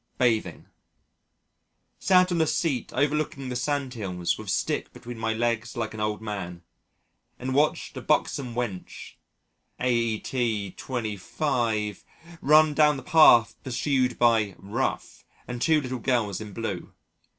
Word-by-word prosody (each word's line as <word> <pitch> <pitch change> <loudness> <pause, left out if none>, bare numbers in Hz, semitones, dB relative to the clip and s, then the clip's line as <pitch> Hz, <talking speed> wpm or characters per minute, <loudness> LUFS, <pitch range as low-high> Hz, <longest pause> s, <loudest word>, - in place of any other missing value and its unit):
Bathing 115 -4 0 1.3
Sat 185 -1 +4
on 170 -2 +1
a 160 - +2
seat 140 -8 -1
overlooking 140 -1 -1
the 125 - -4
sand 135 0 -1
hills 90 -6 -2
with - - -8
stick - - -1
between 120 -1 -9
my 110 0 0
legs 115 +1 -1
like - - -3
an 110 - -7
old 105 0 -2
man, 90 -5 -5 0.7
and 130 +1 -3
watched 150 +3 +1
a - - -5
buxom 125 -4 0
wench 115 -7 -5 0.7
aet. 115 -3 -1
25 110 -1 -2 0.4
run 155 +2 +5
down 150 -1 +4
the 130 - -8
path 125 -7 +6
pursued 130 -1 0
by 110 -5 +3
"Rough" 110 +7 -3 0.2
and 125 -1 -5
two 160 +2 +4
little 130 -3 -4
girls 110 -5 0
in 105 -1 -7
blue. 100 -4 -5
120 Hz, 130 wpm, -26 LUFS, 110-135 Hz, 1.3 s, path